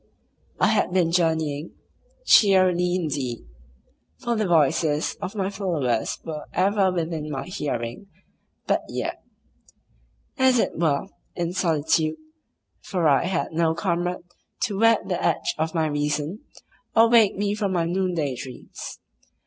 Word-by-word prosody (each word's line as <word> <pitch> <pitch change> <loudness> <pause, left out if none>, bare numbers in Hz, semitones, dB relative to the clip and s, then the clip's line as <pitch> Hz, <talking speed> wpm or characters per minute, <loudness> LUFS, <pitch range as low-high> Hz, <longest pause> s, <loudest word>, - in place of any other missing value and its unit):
I - - +4
had - - +1
been 180 -3 +2
journeying 160 -3 0 0.5
(cheerily 185 - +5
indeed, 140 - -3 0.7
for 240 -2 -2
the 215 -2 0
voices 155 -2 +2
of 195 +3 -5
my 195 -1 -1
followers 155 - -1
were 155 -2 -5
ever 195 0 +2
within 165 -3 -3
my 135 -3 -4
hearing, 140 - -4 0.6
but - - +1
yet), - - -4 1.2
as 260 -1 +5
it - - 0
were, 155 -3 +1 0.3
in 175 0 -2
solitude, 160 -3 +1 0.6
for 175 -5 0
I 145 +3 +3
had 180 -1 -1
no 160 0 +1
comrade 175 -1 -1 0.4
to 200 -3 -1
whet 225 0 +4
the - - -2
edge 355 - +1
of 160 +1 -1
my 160 -1 +2
reason, 150 - -2 0.5
or 225 0 +7
wake 230 -3 +5
me 205 0 0
from 205 -3 -1
my 170 -2 +1
noonday 175 -6 -1
dreams. 125 0 -9
170 Hz, 135 wpm, -24 LUFS, 150-195 Hz, 1.2 s, or